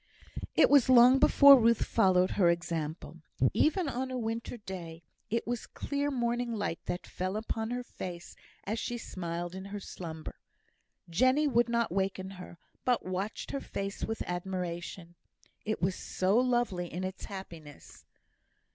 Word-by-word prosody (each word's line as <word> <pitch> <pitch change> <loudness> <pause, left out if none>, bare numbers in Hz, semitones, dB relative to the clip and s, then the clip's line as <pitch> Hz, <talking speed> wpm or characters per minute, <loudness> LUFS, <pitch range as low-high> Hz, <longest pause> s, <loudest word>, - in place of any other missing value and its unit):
It - - +6
was 280 -3 +6
long 255 +1 +7
before 280 -1 +8
Ruth 230 0 +3
followed 185 -1 +3
her 180 -4 +3
example. 170 -2 -3 0.3
Even 340 +2 +2
on 260 -1 -2
a 255 - -3
winter 230 +1 -3
day, 175 -5 -8 0.3
it 230 +3 -1
was 240 0 -3
clear 285 0 -2
morning 240 -2 -1
light 205 -6 -2
that 175 +1 -3
fell 185 +3 -3
upon 220 0 -3
her 245 +1 -3
face 175 -7 -8 0.3
as 220 +3 -3
she 240 - -3
smiled 175 -5 -5
in 190 +1 -7
her 205 +1 -6
slumber. 160 -5 -8 0.7
Jenny 255 - +3
would 240 -3 +2
not 235 -3 +1
waken 190 0 -2
her, 175 - -11 0.3
but 250 -2 +1
watched 185 +4 -4
her 275 - -3
face 195 0 -5
with 225 0 -2
admiration; 175 -1 -5 0.5
it 215 -4 -2
was 185 +1 +2
so 185 +2 -1
lovely 240 -8 +1
in 180 +2 -4
its 185 0 -5
happiness. 170 -7 -10
200 Hz, 150 wpm, -30 LUFS, 180-240 Hz, 0.7 s, before